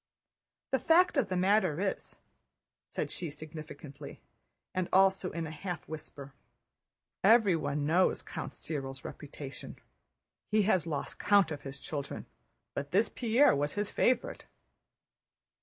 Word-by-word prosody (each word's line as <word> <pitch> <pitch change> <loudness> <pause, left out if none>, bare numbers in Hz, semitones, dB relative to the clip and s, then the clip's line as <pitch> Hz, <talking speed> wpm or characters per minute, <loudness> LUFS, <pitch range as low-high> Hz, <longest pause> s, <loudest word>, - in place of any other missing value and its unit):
"The - - +2
fact 355 +2 +4
of 270 -8 +2
the 185 - -1
matter 185 -3 +3
is," 195 0 -3 0.7
said - - -3
she 170 - -4
significantly, 150 -1 -9 0.5
and 185 -1 -1
also 190 -1 +4
in 165 -1 -4
a 155 - -6
half 175 +3 -5
whisper, 145 -3 -8 0.9
"everyone 185 -9 +4
knows 175 +5 +3
Count 160 - -6
Cyril's 135 -4 -5
reputation.... 140 -3 -8 0.7
He 215 0 +3
has 185 -5 +2
lost 150 -3 -4
count 200 -5 +4
of 145 -2 -4
his 135 0 -8
children, 145 -3 -5 0.5
but 140 0 -4
this 205 +7 +3
Pierre 240 - +4
was 145 +1 -1
his 205 +1 -2
favorite." 255 - +1
170 Hz, 125 wpm, -31 LUFS, 145-200 Hz, 0.9 s, fact